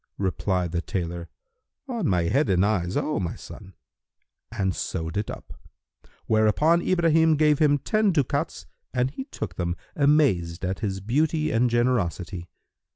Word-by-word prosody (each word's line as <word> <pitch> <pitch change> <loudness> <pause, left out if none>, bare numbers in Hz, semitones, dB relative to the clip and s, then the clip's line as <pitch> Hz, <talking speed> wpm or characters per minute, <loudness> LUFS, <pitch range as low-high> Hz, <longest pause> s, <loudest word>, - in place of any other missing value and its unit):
Replied 95 -2 -1
the 85 -1 -1
tailor, 85 -2 -4 0.6
"On 235 -8 -2
my 90 -3 +2
head 115 - +1
and 95 0 +3
eyes, 95 -2 0
O 150 -2 -1
my 90 -3 -3
son," 95 -3 -12 0.8
and 95 -5 -1
sewed 80 0 -4
it 105 +1 -2
up; - - -8 0.7
whereupon 110 +11 +3
Ibrahim 165 -3 +3
gave 150 -1 +3
him 145 -2 +4
ten 215 - +1
ducats 145 -7 -1 0.3
and 125 +1 +1
he 265 - -6
took - - -6
them, 85 -1 -1 0.2
amazed 135 - +2
at 95 +1 -2
his 95 -3 -3
beauty 155 - +1
and 120 +2 +2
generosity. 95 -7 -1
110 Hz, 145 wpm, -25 LUFS, 90-150 Hz, 0.8 s, him